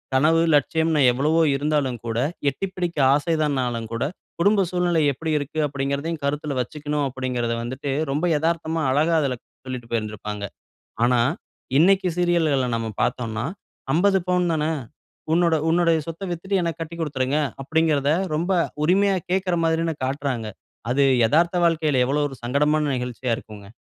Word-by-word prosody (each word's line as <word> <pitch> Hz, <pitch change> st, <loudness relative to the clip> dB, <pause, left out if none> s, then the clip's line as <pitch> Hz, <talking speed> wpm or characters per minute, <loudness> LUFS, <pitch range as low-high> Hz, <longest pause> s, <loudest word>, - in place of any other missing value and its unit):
கனவு, 160 Hz, +5 st, +4 dB
லட்சியம்ன்னு 160 Hz, +2 st, +2 dB
எவ்வளவோ 150 Hz, +6 st, +2 dB
இருந்தாலும் 140 Hz, -4 st, -1 dB
கூட, 115 Hz, 0 st, -2 dB, 0.3 s
எட்டி 195 Hz, +9 st, -4 dB
பிடிக்க 175 Hz, -3 st, -3 dB, 0.2 s
ஆசைதான்னாலும் 140 Hz, -7 st, 0 dB
கூட 115 Hz, -, -1 dB, 0.4 s
குடும்ப 200 Hz, +2 st, +4 dB
சூழ்நிலை 175 Hz, -2 st, +1 dB
எப்பிடி 160 Hz, +4 st, -4 dB
இருக்கு? 145 Hz, +2 st, -5 dB
அப்பிடிங்கிறதையும் 140 Hz, +3 st, -3 dB
கருத்தில 145 Hz, +1 st, -2 dB
வச்சுக்கணும். 150 Hz, +2 st, -3 dB
அப்பிடிங்கிறத 125 Hz, -2 st, -2 dB
வந்துட்டு 130 Hz, +4 st, -5 dB, 0.2 s
ரொம்ப 150 Hz, +5 st, 0 dB
எதார்த்தமா 165 Hz, 0 st, -1 dB
அழகா 155 Hz, +5 st, +2 dB
அதில 130 Hz, -3 st, 0 dB, 0.3 s
சொல்லிட்டு 125 Hz, -3 st, -6 dB
போயிருந்திருப்பாங்க. 105 Hz, -2 st, -3 dB, 0.6 s
ஆனா, 125 Hz, 0 st, +3 dB, 0.6 s
இன்னக்கி 190 Hz, +2 st, +4 dB
சீரியல்கள்ல 160 Hz, -7 st, +2 dB
நம்ம 115 Hz, -1 st, -3 dB
பார்த்தோன்னா, 115 Hz, -1 st, -2 dB, 0.5 s
"50 190 Hz, +4 st, +3 dB
பவுன் 180 Hz, -1 st, +2 dB
தானே! 155 Hz, 0 st, 0 dB, 0.6 s
உன்னோட 170 Hz, -1 st, +3 dB
உன்னோடய 165 Hz, -1 st, +3 dB
சொத்த 165 Hz, +4 st, -6 dB
வித்துட்டு 190 Hz, +3 st, -1 dB
எனக்கு 170 Hz, -2 st, -3 dB
கட்டி 165 Hz, +1 st, -5 dB
குடுத்துருங்க" 140 Hz, -2 st, 0 dB, 0.2 s
அப்பிடிங்கிறத 150 Hz, -1 st, +1 dB, 0.2 s
ரொம்ப 175 Hz, +5 st, -1 dB, 0.3 s
உரிமையா 195 Hz, +3 st, +3 dB, 0.2 s
கேட்கிற 185 Hz, -1 st, +1 dB
மாதிரி 160 Hz, 0 st, +1 dB
தான 165 Hz, -1 st, -1 dB
காட்றாங்க. 130 Hz, -4 st, -2 dB, 0.4 s
அது 140 Hz, +3 st, +3 dB, 0.2 s
எதார்த்த 170 Hz, +7 st, +2 dB
வாழ்க்கையில 155 Hz, -5 st, +2 dB
எவ்ளோ 145 Hz, +2 st, +1 dB
ஒரு 135 Hz, -, -9 dB
சங்கடமான 150 Hz, +5 st, +2 dB
நிகழ்ச்சியா 125 Hz, 0 st, -3 dB
இருக்குங்க. 105 Hz, -2 st, -11 dB
150 Hz, 135 wpm, -23 LUFS, 130-165 Hz, 0.6 s, கனவு